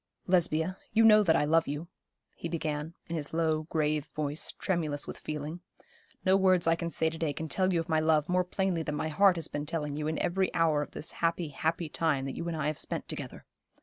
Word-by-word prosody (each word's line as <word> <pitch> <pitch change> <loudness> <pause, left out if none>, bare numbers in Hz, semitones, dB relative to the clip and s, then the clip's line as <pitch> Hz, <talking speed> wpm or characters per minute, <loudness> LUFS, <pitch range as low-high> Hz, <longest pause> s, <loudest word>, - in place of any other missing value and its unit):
'Lesbia, 180 0 +1
you 225 - +5
know 215 -1 +8
that 165 -6 +3
I 145 - +3
love 160 +2 +3
you,' 145 +4 -4 0.5
he 170 - -5
began, 155 -1 -3
in 170 - -3
his 150 -2 -4
low, 155 -2 +1
grave 155 -1 0
voice, 150 0 -2
tremulous 155 -6 -1
with - - -7
feeling. 155 +2 -5 0.7
'No 190 0 +5
words 185 -2 +4
I 165 - +4
can 170 0 -2
say 160 - 0
to 160 - -8
day 155 -3 0
can 160 - -5
tell 185 +5 +2
you 170 - +2
of 165 - -3
my 160 -2 +2
love 155 -1 +2
more 180 0 +2
plainly 180 -1 -1
than 150 -2 -3
my 160 +1 -2
heart 190 +4 +5
has 165 - -2
been 145 0 -4
telling 150 -3 -2
you 150 0 -2
in 155 - -1
every 190 +2 0
hour 160 -3 +3
of 150 - -4
this 155 - -4
happy, 165 -1 -1
happy 160 +4 -1
time 150 -3 0
that 135 - -4
you 170 - -4
and 165 -1 -2
I 150 - -2
have 150 0 -1
spent - - -2
together. - - -6
160 Hz, 235 wpm, -30 LUFS, 150-175 Hz, 0.7 s, know